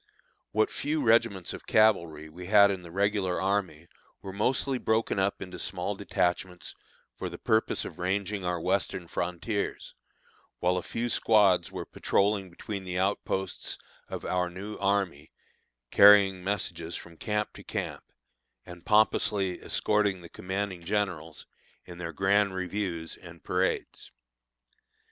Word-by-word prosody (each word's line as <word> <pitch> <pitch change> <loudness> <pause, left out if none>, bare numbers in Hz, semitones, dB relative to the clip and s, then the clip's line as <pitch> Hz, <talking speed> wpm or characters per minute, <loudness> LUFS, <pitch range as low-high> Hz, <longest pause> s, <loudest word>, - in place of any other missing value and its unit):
What 110 +1 +2
few 150 0 -1
regiments 110 -5 +2
of - - -10
cavalry 85 -8 +3
we 90 +3 -10
had 100 0 +7
in 95 -2 -4
the 85 - -11
regular 100 0 0
army 95 -5 -1 0.4
were 95 - -6
mostly 130 +5 0
broken 110 -3 +1
up 95 +1 0
into 90 -1 -9
small - - -2
detachments 90 -1 -2 0.5
for - - -3
the - - -8
purpose 110 0 +1
of - - -9
ranging 100 +2 -1
our 90 -1 -1
Western 95 0 -1
frontiers, 90 +5 -3 0.6
while 90 +1 +1
a - - -1
few 115 +6 -3
squads 105 -6 +3
were - - -5
patrolling 100 -1 0
between 100 +3 -6
the 90 -1 -4
outposts 95 0 -1 0.3
of - - -6
our 90 -1 0
new 100 +4 -7
army, 100 -7 0 0.6
carrying 100 -2 +7
messages 90 -4 -3
from 85 -1 -9
camp 105 +4 -2
to - - -12
camp, - - -4 0.6
and 90 0 -12
pompously 105 -3 +2
escorting 105 -3 +1
the 85 - -11
commanding 95 -1 -4
generals 90 -5 -2 0.4
in 90 -1 -10
their 85 -1 -4
grand 95 +2 +2
reviews 90 -3 -3
and 85 -2 -13
parades. 90 +1 -1
95 Hz, 135 wpm, -28 LUFS, 90-105 Hz, 0.6 s, had